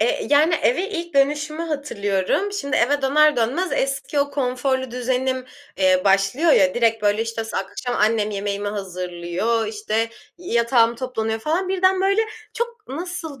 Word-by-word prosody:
eee, 225 - +1
yani, 310 +4 +5
eve 335 +8 +1
ilk 345 -6 -5
dönüşümü 295 +3 +1
hatırlıyorum. 285 - -1
Şimdi 295 -8 -2
eve 285 +3 +2
döner 300 +1 +4
dönmez 265 +11 0
eski 275 +2 -1
o 280 0 0
konforlu 260 -1 -1
düzenim, 255 +1 -1 0.3
eee, 185 -1 +3
başlıyor 195 - +3
ya. 185 -1 +4
Direkt 225 -2 +1
böyle 205 +2 +2
işte 230 0 -4
akşam 225 +3 -4
annem 215 0 +2
yemeğimi 200 0 -3
hazırlıyor, 185 +3 -2
işte 220 +1 -2 0.3
yatağım 235 -7 +2
toplanıyor 225 -4 -2
falan. 340 +8 -1
Birden 375 0 +2
böyle 395 +3 +3 0.3
çok 470 -2 -4
nasıl 325 -2 -6
255 Hz, 145 wpm, -22 LUFS, 215-305 Hz, 0.3 s, yani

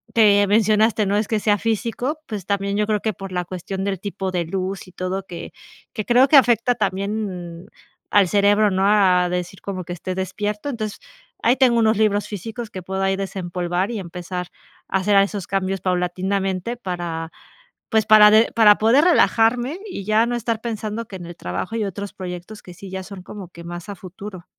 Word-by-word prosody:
que 205 -3 +5
mencionaste, 215 +1 +3
no 200 +1 0
es 210 0 0
que 220 - +1
sea 205 0 +2
físico, 230 +7 -2
pues 205 -5 -5
también 200 0 -1
yo 210 - +2
creo 210 -1 +1
que 220 - -1
por 195 -1 -8
la 180 -1 -1
cuestión 190 +2 -5
del 195 -3 -2
tipo 195 -1 -4
de 180 -2 0
luz 190 +2 -4
y - - -14
todo 185 +1 -3
que 175 -3 -8 0.4
que 215 - -3
creo 245 +2 +5
que 300 - +5
afecta 240 -1 +4
también 195 -4 -3 0.4
al 205 -2 +5
cerebro, 205 +1 +4
¿no?, 190 +1 +1
a 185 -4 +4
decir 180 +1 -4
como 185 -3 -5
que 175 - -5
esté 180 +2 -5
despierto. 205 +5 -3
Entonces, 215 -5 -4 0.4
ahí 240 +2 +4
tengo 245 -3 +4
unos 220 -1 +3
libros 210 -1 +2
físicos 225 +3 -6
que 185 - -7
puedo 190 +1 -3
ahí 195 0 +2
desempolvar 180 -1 -2
y 225 - -3
empezar 180 0 -6 0.4
a - - +2
hacer 200 +2 +2
a 195 - +7
esos 200 -1 -4
cambios 195 0 -1
paulatinamente, 185 +3 -1
para 175 -5 -4 0.6
pues 220 -2 +2 0.3
de 220 +2 +5
para 210 -2 +7
poder 240 +8 +4
relajarme 250 -2 +3
y 350 - -6
ya 215 +2 +3
no 240 0 -2
estar 230 -1 -2
pensando 220 -1 -4
que 195 - -9
en 175 - -9
el 175 - -9
trabajo 90 - -4
hay 220 -2 0
otros 200 +1 -5
proyectos 180 +3 -7
que 180 - -11
sí 195 +2 -10
ya 190 0 -5
son 195 -1 -9
como 195 -3 -9
que 170 -1 -12
más 175 +2 -7
a 200 - -5
futuro. 185 0 -10
200 Hz, 200 wpm, -21 LUFS, 185-220 Hz, 0.6 s, a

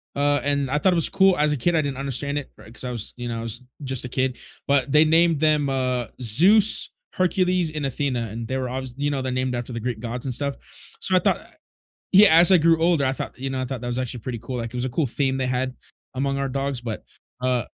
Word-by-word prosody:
uh, 145 0 +1
and 140 -2 0
I 150 - 0
thought 185 +4 +2
it - - 0
was 165 - +6
cool, 190 -1 +3
as 150 0 +2
a 145 - -1
kid, 175 +7 0
I 155 - +3
didn't 140 -3 -4
understand 140 +1 -1
it, 145 - -6
ri 110 - -15
'cause 120 - -3
I 125 - -4
was, 115 -4 +1
you 120 0 -6
know, 115 -1 -4
I - - -5
was 115 +2 0 0.2
just 130 -2 -1
a 125 - -6
kid, 130 0 -1 0.3
but 140 -1 +1
they 150 +1 +6
named 165 0 +3
them, 150 -2 +2
uh, 130 -3 -1
Zeus, 190 - +4 0.2
Hercules, 185 -2 0
and 150 -2 -4
Athena, 125 -3 -2
and 115 +1 -6
they 130 - -3
were 130 -1 -3
obvious 130 -1 -3
You 145 +1 -1
know, 140 -2 -2
they're 130 - -3
named 130 0 -2
after 120 +1 -5
the 115 - -4
Greek 120 -1 -4
Gods 120 +2 -6
and 130 - -3
stuff, 140 +2 -3 0.4
so, 185 - +4
I 185 - +5
thought - - 0
I - - -17 0.7
Yeah, 195 -4 +7
as 175 +2 +9
I 185 - +6
grew 165 0 +3
older, 165 -4 +2
I 130 - +1
thought, 135 - -4
you 135 +1 -4
know, 130 -1 -3
I - - -2
thought 130 -1 -6
that 120 - -4
was 120 +1 -2
actually 125 -1 -4
pretty 120 +1 -6
cool, 125 +2 -6
like, 115 -1 -5
it - - -15
was 125 0 0
a - - -2
cool 145 +4 -1
theme 135 +2 -1
they 130 -1 -1
had 130 0 -2 0.4
among 135 +1 -2
our 140 0 -2
dogs, 135 -1 -1
but, 115 -3 -6 0.4
uh 125 -2 -1
135 Hz, 275 wpm, -22 LUFS, 125-150 Hz, 0.7 s, as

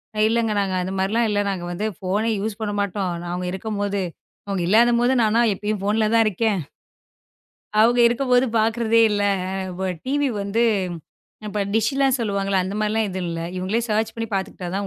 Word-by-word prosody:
நா 215 - -2
இல்லங்க. 230 -1 +1
நாங்க 195 -2 -1
அந்த 185 - -4
மாரி 190 +1 0
எல்லாம் 230 0 +2
இல்ல. 205 - +1
நாங்க 185 -3 -3
வந்து 200 +5 -3
ஃபோன் 195 +4 -1
யூஸ் 210 +1 -3
பண்ண 210 -1 -1
மாட்டோம். 200 -2 -1 0.2
அவங்க 180 0 -3
இருக்கும் 205 +3 -4
போது. 200 -1 -1 0.5
அவங்க 195 -3 -2
இல்லாத 235 +4 +5
போது. 245 +2 +3
நானா 220 +2 +3
எப்பவும் 210 +1 -3
ஃபோன் 210 +3 +1
தான் 225 -1 +5
இருக்கேன். 210 0 0 1.2
அவங்க 240 +2 +4
இருக்கும் 250 +2 -2
போது 250 +1 +5 0.2
பாக்குறதே 230 +1 +2
இல்ல. 205 -1 0 0.3
அ 195 - -3 0.3
உ 190 - 0 0.2
டிவி 285 +1 +1
வந்து 210 +4 0 1.1
டிஸ் 225 +2 +2
எல்லாம் 270 -1 +3
சொல்லுவாங்க. 200 -2 -1
அந்த 195 +2 -4
மாரிலாம் 215 0 0
இது 185 0 -4
இல்ல. 165 0 -4 0.2
இவங்களே 195 +6 -1
சேர்ச் 220 +1 0
பண்ணி 225 0 -3
பாத்துக்கிட்டா 190 -2 -4
தான் 200 0 -2
210 Hz, 180 wpm, -22 LUFS, 195-230 Hz, 1.2 s, இல்லாத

